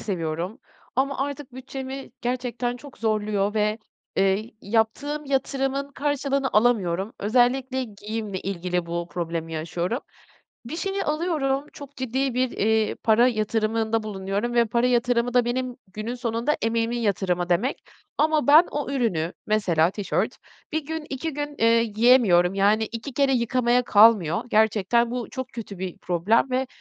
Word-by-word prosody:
seviyorum. 175 Hz, 0 st, -3 dB, 0.4 s
Ama 275 Hz, +1 st, +1 dB
artık 280 Hz, -1 st, -4 dB
bütçemi 265 Hz, +1 st, -7 dB
gerçekten 245 Hz, 0 st, -2 dB
çok 275 Hz, +2 st, -13 dB
zorluyor 210 Hz, -2 st, 0 dB
ve, 210 Hz, 0 st, +1 dB, 0.4 s
eee, 195 Hz, +4 st, +1 dB
yaptığım 235 Hz, +8 st, -1 dB
yatırımın 275 Hz, 0 st, -1 dB
karşılığını 280 Hz, -1 st, 0 dB
alamıyorum. 210 Hz, -3 st, +2 dB
Özellikle 255 Hz, +4 st, +1 dB
giyimle 210 Hz, -2 st, -5 dB
ilgili 180 Hz, -2 st, -2 dB
bu 170 Hz, 0 st, -3 dB
problemi 165 Hz, -2 st, -4 dB
yaşıyorum. 170 Hz, +7 st, -2 dB, 0.7 s
Bir 245 Hz, -, -5 dB
şeyi 390 Hz, +3 st, -2 dB
alıyorum, 300 Hz, -3 st, 0 dB
çok 285 Hz, -1 st, -11 dB
ciddi 260 Hz, +1 st, -1 dB
bir, 255 Hz, 0 st, +1 dB
eee, 220 Hz, +1 st, +1 dB
para 230 Hz, +2 st, +4 dB
yatırımında 220 Hz, 0 st, 0 dB
bulunuyorum 200 Hz, +3 st, -3 dB
ve 235 Hz, -1 st, +4 dB
para 235 Hz, +3 st, +1 dB
yatırımı 245 Hz, 0 st, +1 dB
da 245 Hz, -1 st, +4 dB
benim 250 Hz, +1 st, -2 dB, 0.2 s
günün 220 Hz, +5 st, -4 dB
sonunda 235 Hz, +4 st, -1 dB
emeğimin 230 Hz, +1 st, 0 dB
yatırımı 180 Hz, -5 st, 0 dB
demek. 205 Hz, +10 st, 0 dB, 0.4 s
Ama 305 Hz, -1 st, +2 dB
ben 310 Hz, +4 st, +8 dB
o 290 Hz, -2 st, -3 dB
ürünü 185 Hz, -, 0 dB
-mesela 180 Hz, -6 st, +2 dB
tişört 200 Hz, -1 st, -2 dB, 0.3 s
1 315 Hz, -1 st, -2 dB
gün, 320 Hz, 0 st, -4 dB
2 275 Hz, +4 st, -3 dB
gün, 290 Hz, +1 st, -4 dB
eee, 230 Hz, 0 st, +4 dB
giyemiyorum, 215 Hz, -5 st, +4 dB
yani, 205 Hz, +3 st, +3 dB
2 230 Hz, +4 st, -6 dB
kere 275 Hz, 0 st, +2 dB
yıkamaya 245 Hz, 0 st, +2 dB
kalmıyor. 205 Hz, -7 st, +5 dB
Gerçekten 220 Hz, +2 st, +2 dB
bu 245 Hz, -1 st, -4 dB
çok 260 Hz, -1 st, -5 dB
kötü 215 Hz, -4 st, -7 dB
bir 185 Hz, -2 st, -5 dB
problem 185 Hz, +9 st, +1 dB
ve 260 Hz, +1 st, 0 dB
235 Hz, 140 wpm, -24 LUFS, 205-265 Hz, 0.7 s, ben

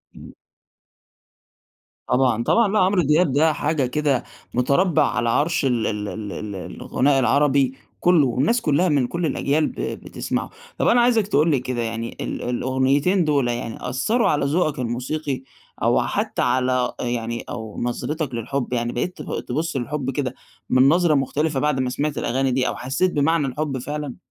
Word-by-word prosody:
إمم. -, -, -12 dB, 1.7 s
طبعًا 125 Hz, -3 st, +2 dB
طبعًا، 230 Hz, -, +3 dB
لا 215 Hz, -, +3 dB
عمرو 185 Hz, 0 st, +3 dB
دياب 150 Hz, +1 st, +3 dB
ده 155 Hz, +3 st, +3 dB
حاجة 145 Hz, -2 st, 0 dB
كده 135 Hz, -1 st, 0 dB, 0.3 s
مُتربّع 140 Hz, +8 st, +3 dB
على 120 Hz, -1 st, -1 dB
عرش 150 Hz, +5 st, +1 dB
ال 120 Hz, -4 st, +1 dB
ال 105 Hz, -1 st, -3 dB
ال 100 Hz, +1 st, -6 dB
ال 105 Hz, -2 st, -6 dB
الغناء 135 Hz, +8 st, 0 dB
العربي 135 Hz, +1 st, +3 dB, 0.3 s
كلّه، 170 Hz, -6 st, +4 dB
والناس 145 Hz, -, +1 dB
كلّها 165 Hz, +3 st, +2 dB
من 140 Hz, -5 st, +2 dB
كُلّ 170 Hz, +5 st, -2 dB
الأجيال 150 Hz, +1 st, +1 dB
ب -, -, -7 dB
بتسمعه. -, -, -4 dB, 0.3 s
طَب -, -, +1 dB
أنا 240 Hz, 0 st, +5 dB
عايزك 230 Hz, -4 st, +3 dB
تقول 155 Hz, -3 st, +3 dB
لي 135 Hz, -, +2 dB
كده 125 Hz, -1 st, -3 dB
يعني 115 Hz, 0 st, -4 dB
ال -, -, -4 dB
الأغنيتين 130 Hz, +8 st, +1 dB
دول 140 Hz, -4 st, +2 dB
يعني 120 Hz, 0 st, -4 dB
أثّروا 215 Hz, -, +1 dB
على 145 Hz, -2 st, +1 dB
ذوقك 150 Hz, 0 st, 0 dB
الموسيقي 130 Hz, +3 st, -3 dB, 0.4 s
أو -, -, +3 dB
حتى -, -, -1 dB
على 125 Hz, 0 st, +1 dB
يعني 120 Hz, -1 st, -3 dB
أو 110 Hz, -3 st, -6 dB
نظرتك 140 Hz, +3 st, -3 dB
للحب، 125 Hz, +3 st, -3 dB
يعني 120 Hz, 0 st, -1 dB
بقيت 180 Hz, +9 st, -3 dB
تب -, -, -4 dB
تبص 155 Hz, +4 st, -3 dB
للحب 135 Hz, +1 st, -3 dB
كده 130 Hz, -2 st, -2 dB, 0.4 s
من 130 Hz, +2 st, +5 dB
نظرة 170 Hz, -1 st, +3 dB
مختلفة 145 Hz, +1 st, 0 dB
بعد 150 Hz, -1 st, +1 dB
ما 130 Hz, -1 st, 0 dB
سمعت 145 Hz, +3 st, -2 dB
الأغاني 130 Hz, +2 st, 0 dB
دي، 125 Hz, 0 st, +1 dB
أو -, -, -2 dB
حسيت 135 Hz, +9 st, 0 dB
بمعنى 150 Hz, 0 st, +1 dB
الحب 140 Hz, 0 st, -3 dB
فعلًا؟ 145 Hz, +1 st, -5 dB
135 Hz, 165 wpm, -22 LUFS, 125-155 Hz, 1.7 s, أنا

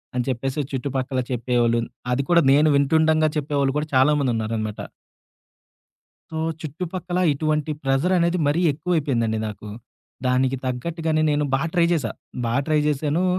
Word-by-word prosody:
అని 125 Hz, -1 st, 0 dB
చెప్పేసి, 130 Hz, +3 st, -2 dB
చుట్టుపక్కల 130 Hz, 0 st, -2 dB
చెప్పేవాళ్ళు, 120 Hz, -1 st, +1 dB, 0.3 s
అది 130 Hz, -, +1 dB
కూడా 170 Hz, -2 st, +5 dB
నేను 150 Hz, +3 st, +5 dB
వింటుండంగా 155 Hz, +2 st, +3 dB
చెప్పేవాళ్ళు 140 Hz, -2 st, 0 dB
కూడా 150 Hz, -, -4 dB
చాలామందున్నారనమాట. 115 Hz, -6 st, +1 dB, 1.5 s
సో, 160 Hz, -, -6 dB, 0.3 s
చుట్టుపక్కల 180 Hz, +3 st, -4 dB
ఇటువంటి 155 Hz, +1 st, -1 dB
ప్రెషర్ 135 Hz, +7 st, +2 dB
అనేది 170 Hz, +1 st, +1 dB
మరీ 155 Hz, +4 st, +1 dB
ఎక్కువైపోయిందండి 140 Hz, -9 st, 0 dB
నాకు. 105 Hz, 0 st, -9 dB, 0.6 s
దానికి 130 Hz, +1 st, +2 dB
తగ్గట్టుగానే 155 Hz, +5 st, -1 dB
నేను 150 Hz, 0 st, +1 dB
బా 135 Hz, -, +1 dB
ట్రై 170 Hz, -1 st, +4 dB
చేశా. 135 Hz, -9 st, 0 dB, 0.3 s
బా 115 Hz, 0 st, -1 dB
ట్రై 155 Hz, -1 st, +2 dB
జేశాను. 150 Hz, +4 st, 0 dB
140 Hz, 125 wpm, -23 LUFS, 125-160 Hz, 1.5 s, కూడా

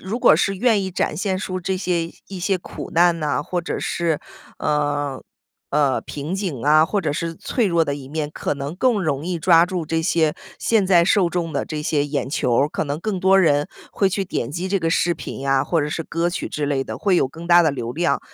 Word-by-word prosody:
如 205 Hz, +6 st, -4 dB
果 -, -, +6 dB
是 195 Hz, +5 st, +1 dB
愿 220 Hz, -2 st, +2 dB
意 190 Hz, -, -3 dB
展 170 Hz, -4 st, -1 dB
现 190 Hz, +1 st, -1 dB
出 185 Hz, -2 st, -4 dB
这 190 Hz, +1 st, -1 dB
些 175 Hz, -3 st, -1 dB, 0.2 s
一 190 Hz, -2 st, -7 dB
些 190 Hz, +1 st, +1 dB
苦 -, -, -8 dB
难 170 Hz, 0 st, +4 dB
呐， 145 Hz, -4 st, 0 dB
或 175 Hz, +3 st, -2 dB
者 175 Hz, -, -4 dB
是， 165 Hz, -3 st, -1 dB, 0.4 s
呃， 145 Hz, -2 st, -1 dB, 0.5 s
呃， 140 Hz, -2 st, +2 dB
瓶 150 Hz, +5 st, -5 dB
颈 180 Hz, -, -3 dB
啊， 155 Hz, +2 st, +6 dB
或 205 Hz, +5 st, -1 dB
者 155 Hz, -5 st, -1 dB
是 165 Hz, +2 st, -3 dB
脆 240 Hz, -5 st, -1 dB
弱 170 Hz, -3 st, +2 dB
的 145 Hz, -, -2 dB
一 135 Hz, -2 st, -9 dB
面， 150 Hz, 0 st, -3 dB
可 -, -, -2 dB
能 140 Hz, +3 st, -5 dB
更 230 Hz, -2 st, +2 dB
容 150 Hz, -2 st, -1 dB
易 180 Hz, -1 st, -2 dB
抓 165 Hz, 0 st, +5 dB
住 180 Hz, -3 st, -3 dB
这 165 Hz, 0 st, 0 dB
些 160 Hz, -2 st, +2 dB, 0.2 s
现 215 Hz, -4 st, +2 dB
在 175 Hz, -3 st, +5 dB
受 185 Hz, -2 st, +3 dB
众 170 Hz, -2 st, -2 dB
的 140 Hz, -, -1 dB
这 155 Hz, -1 st, -5 dB
些 150 Hz, -2 st, +1 dB
眼 145 Hz, -2 st, -2 dB
球 125 Hz, -3 st, 0 dB
儿， 145 Hz, -, -2 dB
可 -, -, -2 dB
能 145 Hz, +1 st, -4 dB
更 200 Hz, -1 st, -2 dB
多 190 Hz, +1 st, +5 dB
人 145 Hz, -4 st, +3 dB, 0.3 s
会 195 Hz, -, +2 dB
去 195 Hz, +1 st, -1 dB
点 120 Hz, -9 st, -3 dB
击 175 Hz, +5 st, -3 dB
这 195 Hz, -, +1 dB
个 165 Hz, -2 st, -1 dB
视 175 Hz, +1 st, +2 dB
频 140 Hz, -3 st, -6 dB
啊， 135 Hz, 0 st, +3 dB
或 165 Hz, +1 st, +1 dB
者 145 Hz, -, -1 dB
是 165 Hz, -, -3 dB
歌 165 Hz, +2 st, -1 dB
曲 -, -, -3 dB
之 150 Hz, -1 st, -3 dB
类 140 Hz, -2 st, 0 dB
的， -, -, -6 dB
会 195 Hz, -3 st, +2 dB
有 150 Hz, -, +3 dB
更 165 Hz, +5 st, -10 dB
大 175 Hz, 0 st, +6 dB
的 160 Hz, -, +3 dB
流 120 Hz, -4 st, -4 dB
量。 170 Hz, +4 st, 0 dB
165 Hz, 260 characters per minute, -21 LUFS, 145-185 Hz, 0.5 s, 果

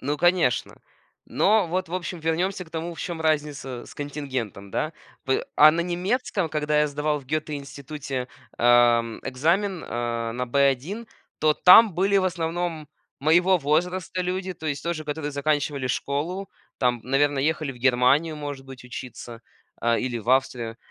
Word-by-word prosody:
Ну 145 Hz, +3 st, -1 dB
конечно. 175 Hz, -6 st, +1 dB, 0.5 s
Но 210 Hz, -1 st, +3 dB
вот, 185 Hz, +1 st, -2 dB
в 170 Hz, -, -5 dB
общем, 180 Hz, -1 st, -4 dB
вернёмся 180 Hz, +4 st, -1 dB
к -, -, -18 dB
тому, 165 Hz, +1 st, -4 dB
в 165 Hz, -, -12 dB
чём 170 Hz, -2 st, -4 dB
разница 145 Hz, -5 st, -1 dB
с -, -, -13 dB
контингентом 130 Hz, -9 st, -5 dB
да. 155 Hz, -, -2 dB, 0.3 s
П 130 Hz, -1 st, 0 dB
а, 150 Hz, +1 st, +9 dB
на 165 Hz, +2 st, -1 dB
немецком, 185 Hz, +2 st, -1 dB
когда 150 Hz, -1 st, 0 dB
я 150 Hz, -, +3 dB
сдавал 150 Hz, +1 st, -1 dB
в 140 Hz, -, -14 dB
Гётте 155 Hz, +3 st, -2 dB
институте, 140 Hz, -2 st, -6 dB, 0.3 s
а, 120 Hz, 0 st, +6 dB
м, 115 Hz, -1 st, -7 dB
экзамен, 170 Hz, +8 st, 0 dB
э, 115 Hz, -1 st, -3 dB
на 125 Hz, +2 st, -2 dB
Б1, 140 Hz, -, +1 dB, 0.3 s
то 155 Hz, -1 st, +4 dB
там 195 Hz, +4 st, +8 dB
были 195 Hz, +3 st, +3 dB
в -, -, +1 dB
основном 170 Hz, -2 st, -2 dB, 0.3 s
моего 175 Hz, +6 st, +4 dB
возраста 175 Hz, +4 st, -1 dB
люди, 185 Hz, +1 st, -2 dB
то 160 Hz, -1 st, -8 dB
есть 140 Hz, -3 st, -2 dB
тоже, 170 Hz, -2 st, -2 dB
которые 150 Hz, 0 st, -3 dB
заканчивали 145 Hz, -1 st, -1 dB
школу, 165 Hz, +10 st, -2 dB, 0.3 s
там, 125 Hz, -2 st, +1 dB
наверное, 135 Hz, +1 st, +1 dB
ехали 155 Hz, -3 st, -2 dB
в -, -, -15 dB
Германию, 135 Hz, +5 st, +3 dB
может 145 Hz, -2 st, -6 dB
быть, 130 Hz, -1 st, -11 dB
учиться, 120 Hz, -2 st, -8 dB, 0.4 s
а, 115 Hz, 0 st, +2 dB
или 125 Hz, -1 st, -2 dB
в 110 Hz, -, -12 dB
Австрию, 125 Hz, -3 st, +1 dB
150 Hz, 165 wpm, -25 LUFS, 130-175 Hz, 0.5 s, а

